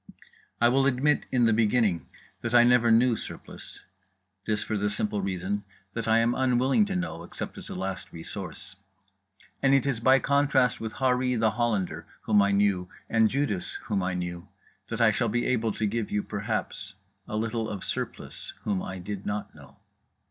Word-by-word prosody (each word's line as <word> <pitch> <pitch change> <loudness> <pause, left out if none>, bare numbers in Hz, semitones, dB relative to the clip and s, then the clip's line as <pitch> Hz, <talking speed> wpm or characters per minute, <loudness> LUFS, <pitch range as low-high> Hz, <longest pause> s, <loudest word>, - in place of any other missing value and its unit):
I 120 - +5
will 135 +3 +3
admit, 140 +3 +2
in 125 -2 +3
the 115 - +4
beginning, 110 -5 +2 0.3
that 120 +1 -1
I 120 - +8
never 120 -1 +4
knew 115 +1 +5
Surplice. - - -9 0.6
This 105 -1 0
for 110 - -3
the 105 0 0
simple 105 0 -1
reason 95 +2 -2 0.3
that 115 - -3
I 110 0 +5
am 115 +1 +3
unwilling 130 - +3
to 195 - -3
know 180 - -3
except 85 - -6
as - - -10
a - - -6
last 95 0 -4
resource. 95 +3 -8 0.8
And 135 0 +5
it 135 - +2
is 135 -5 0
by 130 +3 +5
contrast 140 -2 +2
with 110 -1 -4
Harree 125 -1 +1
The 110 -1 +3
Hollander, 110 -5 -1
whom 105 -2 +4
I 100 0 +3
knew, 100 -3 +2 0.2
and 110 -1 +4
Judas, 130 -9 -1
whom 100 -3 -1
I 90 0 -1
knew, 90 0 -4 0.4
that - - -2
I - - +6
shall - - 0
be 120 +3 0
able 115 -3 +1
to 110 - -1
give 110 +1 -1
you 105 0 -1
(perhaps) 100 -1 -4 0.3
a - - -4
little 115 0 -1
of 100 -3 -5
Surplice, - - -5
whom 100 -3 0
I 95 - -5
did 100 +2 -6
not 105 0 -3
know. - - -16
110 Hz, 185 wpm, -27 LUFS, 100-125 Hz, 0.8 s, I